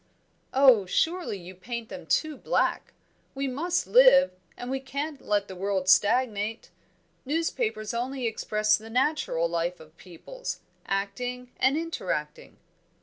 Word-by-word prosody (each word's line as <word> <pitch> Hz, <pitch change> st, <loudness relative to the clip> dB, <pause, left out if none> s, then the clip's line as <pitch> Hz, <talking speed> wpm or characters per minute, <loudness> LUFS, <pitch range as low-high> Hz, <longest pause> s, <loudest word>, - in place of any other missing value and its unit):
"Oh, 260 Hz, -8 st, +5 dB
surely 335 Hz, -, 0 dB
you 180 Hz, 0 st, -10 dB
paint 230 Hz, +5 st, -6 dB
them 280 Hz, -, -9 dB
too 310 Hz, -1 st, +1 dB
black! -, -, -1 dB, 0.4 s
We 275 Hz, 0 st, -1 dB
must 335 Hz, +7 st, -1 dB
live, -, -, +6 dB, 0.3 s
we 265 Hz, +2 st, -2 dB
can't 280 Hz, +2 st, -5 dB
let 205 Hz, -1 st, 0 dB
the 190 Hz, -, -8 dB
world 190 Hz, 0 st, -1 dB
stagnate. 215 Hz, +2 st, +2 dB, 0.5 s
Newspapers 320 Hz, -, -1 dB
only 250 Hz, +2 st, -3 dB
express 215 Hz, -1 st, +1 dB
the 220 Hz, +1 st, -11 dB
natural 250 Hz, -, +1 dB
life 170 Hz, +1 st, -2 dB
of 155 Hz, 0 st, -16 dB
peoples, 345 Hz, -, -8 dB, 0.3 s
acting 245 Hz, +6 st, -3 dB
and 265 Hz, +3 st, +3 dB
interacting." 330 Hz, +8 st, -4 dB
245 Hz, 125 wpm, -27 LUFS, 200-280 Hz, 0.5 s, live